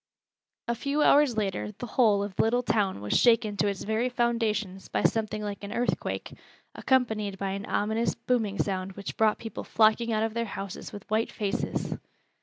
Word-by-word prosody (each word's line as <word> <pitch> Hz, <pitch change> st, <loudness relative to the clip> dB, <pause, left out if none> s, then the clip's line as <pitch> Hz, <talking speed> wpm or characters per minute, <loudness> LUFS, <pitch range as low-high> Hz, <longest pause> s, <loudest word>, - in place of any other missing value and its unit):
A 235 Hz, -, +1 dB
few 280 Hz, +5 st, 0 dB
hours 280 Hz, -5 st, +5 dB
later 185 Hz, -, -2 dB
the -, -, -5 dB
whole 215 Hz, -4 st, +3 dB
of 200 Hz, -2 st, -6 dB
the -, -, +3 dB
little 245 Hz, +3 st, +2 dB
town 200 Hz, -, 0 dB
was 105 Hz, -, -2 dB
shaken 230 Hz, -3 st, +4 dB
to 205 Hz, -, +2 dB
its 200 Hz, -1 st, -2 dB
very 220 Hz, +4 st, 0 dB
foundations 225 Hz, -6 st, -1 dB
by -, -, -1 dB
something 215 Hz, -1 st, 0 dB
like 205 Hz, -1 st, -5 dB
an 200 Hz, -, -6 dB
earthquake, 240 Hz, +2 st, -2 dB, 0.4 s
accompanied 220 Hz, -6 st, +1 dB
by 195 Hz, 0 st, -2 dB
an 200 Hz, +1 st, -5 dB
ominous, 220 Hz, +3 st, 0 dB
booming 220 Hz, -5 st, -1 dB
sound 190 Hz, -1 st, -2 dB
which 200 Hz, +1 st, -6 dB
brought 220 Hz, -1 st, +3 dB
people 225 Hz, -3 st, -7 dB
flocking 225 Hz, +1 st, +3 dB
out 215 Hz, 0 st, +1 dB
of 225 Hz, -1 st, -1 dB
their 235 Hz, 0 st, -1 dB
houses 195 Hz, -2 st, -6 dB
with 205 Hz, 0 st, -10 dB
white 220 Hz, +1 st, +1 dB
faces. 205 Hz, -2 st, -2 dB
215 Hz, 185 wpm, -28 LUFS, 200-235 Hz, 0.4 s, hours